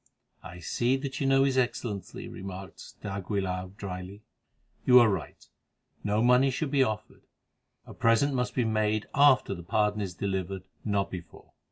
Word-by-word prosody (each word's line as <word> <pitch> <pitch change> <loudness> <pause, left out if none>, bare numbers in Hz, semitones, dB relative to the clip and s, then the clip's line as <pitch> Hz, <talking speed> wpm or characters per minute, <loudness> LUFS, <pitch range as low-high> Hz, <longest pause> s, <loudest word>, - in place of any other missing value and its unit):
"I 90 -1 -10
see 120 +8 0
that 135 0 -5
you 135 - +1
know 135 0 +5
his 135 -1 +2
Excellency," 120 -5 -3
remarked 95 0 -9
d'Aguilar 95 -2 -2
drily. 95 +1 -7 0.6
"You 125 - +7
are 120 - +6
right, 95 -6 -4 0.6
no 105 +2 +1
money 125 +2 +5
should 135 +2 -2
be 140 -2 +3
offered; 110 -4 -2 0.6
a - - -11
present 115 +5 +3
must 125 -1 -1
be 125 - +2
made 110 -1 +1
after 140 -7 +5
the 85 - -7
pardon 105 +3 0
is 95 -3 -4
delivered—not 95 +1 -3
before. 85 -3 -10
105 Hz, 150 wpm, -28 LUFS, 95-125 Hz, 0.6 s, You